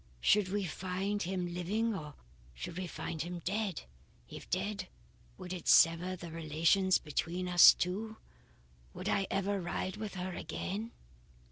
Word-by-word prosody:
Should 205 - +4
we 200 0 -1
find 190 +4 -2
him 180 -1 -2
living, 210 +6 0
or 150 -5 -7 0.4
should - - -6
we 185 0 -4
find 160 -1 -5
him 175 +1 -4
dead? 200 -2 -2 0.4
If - - -10
dead, 190 +1 -2 0.5
would 185 -1 -6
it 180 - -7
sever 165 +3 +5
the 175 -2 -9
relations 165 +4 +2
between 170 +4 -3
us 175 -1 +9
two? 215 +5 -3 0.8
Would - - -5
I 195 -1 +1
ever 195 0 0
ride 185 +3 -3
with 210 -2 -5
her 185 0 -4
again?" 200 +8 -4
185 Hz, 145 wpm, -33 LUFS, 175-200 Hz, 0.8 s, us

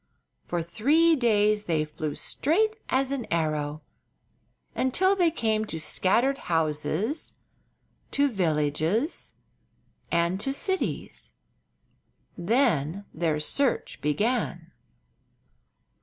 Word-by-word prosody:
For 175 -1 -1
three 300 - +3
days 210 -5 +2
they 155 -3 +1
flew 150 0 -5
straight 435 +9 0
as 265 +1 +1
an 270 -4 -3
arrow, 155 -2 -1 0.9
until 375 +10 +2
they 355 -3 +3
came 220 -8 0
to 165 -6 -5
scattered 240 - +2
houses, 160 - -1 0.7
to 285 0 +2
villages, 170 - 0 0.8
and 170 +2 +1
to 270 - 0
cities. 380 +6 -2 1.0
Then 200 - +1
their 160 -2 0
search 265 - 0
began. 175 - -1
205 Hz, 90 wpm, -27 LUFS, -, 1.0 s, three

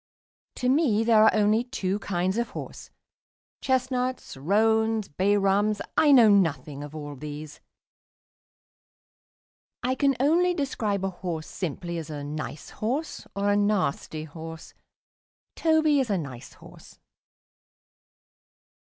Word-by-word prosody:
To 250 - -2
me 255 -6 +3
there 225 -2 +5
are 220 - +6
only 215 +2 +3
two 205 -6 -2
kinds 190 +1 -1
of 235 - -1
horse. - - -8 0.7
Chestnuts, 255 - -1
roans, 220 +7 +2
bay 195 +7 +1
rums 205 +1 +2 0.2
I 300 - +5
know 245 -5 +8
nothing 150 -8 +1
of 145 +1 -9
all 145 -1 -6
these; 150 +2 -8 2.2
I 255 +1 +1
can 275 0 +2
only 345 +6 +3
describe 215 - -1
a 195 - -2
horse 175 -3 -5
simply 170 0 -4
as 160 - -8
a 145 -2 -5
nice 150 +1 -6
horse 265 +9 -3
or 200 0 +1
a - - +3
nasty 205 -7 0
horse. 160 +1 -9 0.8
Toby 315 -3 +3
is 260 -4 0
a 200 - +1
nice 130 -7 -7
horse. - - -16
205 Hz, 125 wpm, -26 LUFS, 160-250 Hz, 2.2 s, know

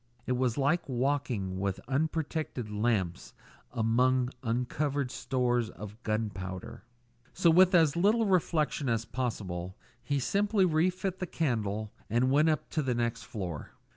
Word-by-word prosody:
It - - -2
was 125 -1 +1
like 145 +4 +1
walking 125 -8 -1
with 100 -1 -1
unprotected 150 -4 -2
lamps 105 -5 -1 0.4
among 125 +2 +2
uncovered 130 +3 -1
stores 120 -4 0
of 105 +1 -10
gun 110 -1 -1
powder. 95 +3 -7 0.5
So, 175 -2 +4
with 185 +2 +6
as 160 -3 +5
little 210 +6 +3
reflection 160 -7 +1
as 115 -1 0
possible, 95 -7 -4 0.2
he 140 +4 -1
simply 200 - +2
relit 185 +3 0
the 185 - -3
candle 110 -10 -1 0.2
and 120 +4 +2
went 150 +3 +4
up 155 -3 0
to 155 - 0
the 130 -4 0
next 120 -1 -1
floor. 90 -9 -6
125 Hz, 140 wpm, -30 LUFS, 110-155 Hz, 0.5 s, with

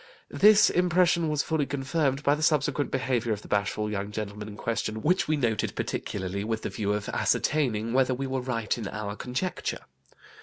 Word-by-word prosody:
This 210 +1 +6
impression 175 -2 +3
was 150 -1 +1
fully 155 -3 0
confirmed 140 0 -1
by 145 - +4
the 150 - -2
subsequent 150 -2 +1
behaviour 125 -3 0
of 105 - -6
the - - -11
bashful 105 +1 -1
young 100 -1 -3
gentleman 105 0 -5
in 105 -1 -9
question, 110 -1 -2
which 180 +4 +2
we 155 0 +1
noted 115 -6 0
particularly, 100 0 -3
with 110 0 -3
the - - -2
view 105 -2 -2
of 105 0 -3
ascertaining 115 -7 0
whether 130 0 +3
we 135 +2 -3
were 130 -1 -2
right 115 -4 -1
in 110 - -4
our 105 -1 -5
conjecture. 130 - -3
125 Hz, 185 wpm, -27 LUFS, 105-150 Hz, -, This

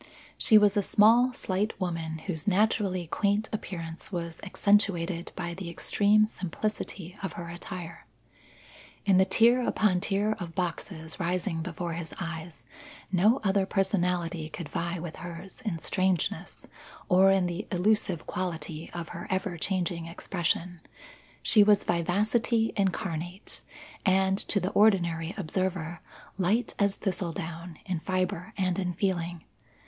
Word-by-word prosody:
She 220 - +6
was 210 0 +5
a 205 - +3
small, 230 +6 +5
slight 200 -3 -2
woman 165 -3 -2
whose 165 -3 -4
naturally 200 -2 +2
quaint 205 +5 0
appearance 170 -4 -6
was 170 -3 -4
accentuated 190 -4 +1
by 175 -1 -4
the 180 -1 -6
extreme 205 +5 +3
simplicity 190 -2 -4
of 195 - -4
her 170 0 -7
attire. 175 0 -8 1.0
In 190 -2 +5
the 190 - +6
tier 235 +6 +5
upon 210 -6 +2
tier 205 +2 +1
of 170 -3 -6
boxes 170 -2 -4
rising 175 -1 -1
before 170 0 -4
his 165 -1 -5
eyes, 165 -2 -6 0.5
no 210 +7 +4
other 195 -1 +2
personality 180 -5 0
could 160 -1 -7
vie 170 +1 -2
with 165 -1 -6
hers 175 +2 -8
in 205 -7 -2
strangeness, 185 0 -1 0.4
or 190 +2 +6
in 195 -1 +4
the 175 +3 -3
illusive 185 -2 +1
quality 165 -3 -4
of 170 -2 -5
her 170 0 -7
ever 190 -1 -1
changing 175 -1 -2
expression. 175 0 -2 0.6
She 210 - +7
was 205 0 +5
vivacity 215 +6 +1
incarnate 180 -2 -2 0.4
and, 190 0 +3
to 205 - +2
the 185 +1 -2
ordinary 170 -5 +3
observer, 175 -2 -2 0.4
light 205 +7 +1
as 200 -1 +2
thistledown 170 -3 -4
in 185 -4 -2
fibre 185 +3 -2
and 185 -1 0
in 180 -2 -1
feeling. 175 -3 -1
185 Hz, 135 wpm, -28 LUFS, 170-200 Hz, 1.0 s, She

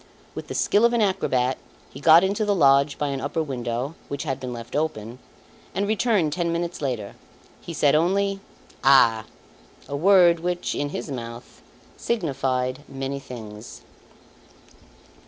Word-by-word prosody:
With - - -7
the - - -6
skill 210 - +2
of 235 0 +4
an 235 - +2
acrobat, 130 -10 0 0.3
he 135 - -10
got 160 +4 +7
into 200 +3 0
the 205 -1 +1
lodge 140 -3 +4
by 145 - -1
an 135 -1 -3
upper 165 +3 -2
window 125 0 -4
which 140 -1 -4
had 135 -4 -3
been 130 -1 -6
left 115 -1 -8
open, 125 -6 -3 0.6
and 200 +2 0
returned 210 -7 +1
ten 170 0 -1
minutes 170 0 -3
later. 120 -8 -3 0.5
He - - -8
said 145 -1 +3
only, 195 +5 +1 0.4
"Ah!" 120 -5 +5 0.6
a 140 - -4
word 175 +1 +5
which, 175 +1 -2
in 145 - -2
his 145 - -6
mouth, 120 -1 -8 0.4
signified 135 - -1
many 135 0 -4
things. 110 -4 -10
140 Hz, 150 wpm, -24 LUFS, 130-175 Hz, 0.6 s, got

